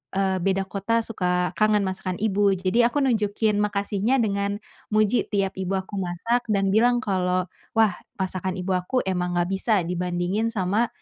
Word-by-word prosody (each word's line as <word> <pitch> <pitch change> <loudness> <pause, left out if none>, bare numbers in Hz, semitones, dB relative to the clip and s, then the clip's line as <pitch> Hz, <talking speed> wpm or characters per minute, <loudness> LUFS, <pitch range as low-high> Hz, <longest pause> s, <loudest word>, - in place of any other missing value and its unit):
eee, 190 -1 +1
beda 195 +2 +1
kota 200 +4 -1
suka 180 -5 -1
kangen 215 -1 +3
masakan 185 -1 -3
ibu. 205 -1 +2
Jadi, 190 +6 +2
aku 285 +3 0
nunjukin 215 -3 +1
makasihnya 205 +3 0
dengan, 200 -1 -1 0.4
muji 215 +3 +2
tiap 195 -2 -1
ibu 190 +1 -1
aku 190 +1 -4
masak 230 +8 -1
dan 195 -2 +1
bilang 240 +3 +3
kalau, 185 -3 +1 0.3
"Wah, 220 -2 +5 0.2
masakan 185 -1 -3
Ibu 185 0 -3
aku 180 +8 -6
emang 180 -2 -1
nggak 175 +1 0
bisa 195 -1 +1
dibandingin 180 +4 -1
sama 215 +1 0
195 Hz, 160 wpm, -24 LUFS, 185-215 Hz, 0.4 s, Wah